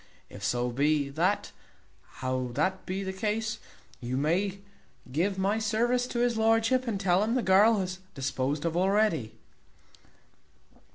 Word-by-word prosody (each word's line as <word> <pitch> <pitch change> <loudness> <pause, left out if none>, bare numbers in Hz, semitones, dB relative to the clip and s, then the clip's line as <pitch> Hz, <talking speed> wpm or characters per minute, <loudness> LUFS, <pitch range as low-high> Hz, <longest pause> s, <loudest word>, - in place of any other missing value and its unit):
If 100 - -10
so 120 +4 0
be 145 +2 +1
that 175 +8 0 0.7
how 130 0 -1
that 190 +8 -1
be 190 +2 -2
the 190 0 -4
case 215 +3 -2 0.4
you 125 +1 -3
may 185 +7 0 0.5
give 185 +8 0
my 200 +3 +1
service 240 +3 +1
to 240 - -2
his 240 -2 +1
lordship, 225 +3 +2
and 210 -4 -1
tell 185 -1 +2
un 225 +3 0
the 255 - +1
girl 205 +3 +5
is 185 0 -3 0.2
disposed 135 +3 -2
of 165 0 -1
already." 190 - +1
190 Hz, 140 wpm, -28 LUFS, 145-220 Hz, 0.7 s, girl